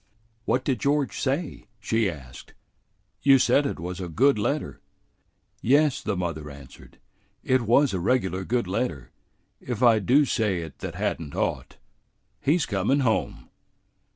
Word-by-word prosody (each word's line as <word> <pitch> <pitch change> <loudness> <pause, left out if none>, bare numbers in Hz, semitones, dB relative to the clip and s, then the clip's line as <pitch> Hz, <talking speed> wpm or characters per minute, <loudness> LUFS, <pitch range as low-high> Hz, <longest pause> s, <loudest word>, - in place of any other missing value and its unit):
"What 125 +1 +1
did 130 -5 -1
George 140 +1 0
say?" 140 +4 -2
she 110 -3 0
asked. 65 -7 -11 0.7
"You 135 -1 +6
said 140 +2 +3
it - - -5
was 90 +2 -5
a 90 - -5
good 125 - +3
letter." 145 +8 -2 0.8
"Yes," 145 +3 +3
the 105 -3 -2
mother 80 -4 -4
answered, 70 -2 -14 0.5
"it 130 0 +2
was 120 +3 +3
a 95 - -1
regular 95 -2 0
good 120 +3 -1
letter, 95 - -3 0.5
if 125 0 -4
I 115 -3 +6
do 135 +9 +3
say 105 -8 0
it 80 - -10
that - - -6
had - - -2
n't 75 -3 -8
ought. - - -3 0.6
He's 155 +1 +1
comin' 110 +7 0
home." 115 -4 -1
115 Hz, 150 wpm, -25 LUFS, 90-135 Hz, 0.8 s, You